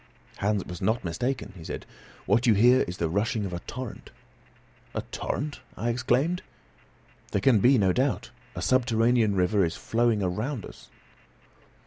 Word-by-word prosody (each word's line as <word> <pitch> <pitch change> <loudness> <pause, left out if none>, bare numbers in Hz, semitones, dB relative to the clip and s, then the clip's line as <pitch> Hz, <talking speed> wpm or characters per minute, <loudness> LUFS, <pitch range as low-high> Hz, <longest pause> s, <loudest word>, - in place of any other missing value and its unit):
"Hans 100 -1 0
was 90 - -8
not 110 +5 +1
mistaken," 120 +9 -2
he 85 - -10
said. - - -6 0.4
"What 120 +2 +2
you 110 - +6
hear 125 +5 +6
is 90 +1 -3
the 85 - 0
rushing 105 - 0
of 90 - -5
a 85 - -3
torrent." 125 +4 -7 0.9
"A - - -2
torrent?" 145 +1 -3 0.2
I 115 - -1
exclaimed. 130 +9 +1 0.9
"There 100 - +2
can 115 +2 +4
be 125 +6 +5
no 95 -4 +3
doubt; 125 -1 0 0.2
a - - -4
subterranean 115 -3 +3
river 95 +2 +3
is 80 - -1
flowing 115 -3 +1
around 110 +7 -2
us." - - -13
115 Hz, 155 wpm, -27 LUFS, 95-125 Hz, 0.9 s, you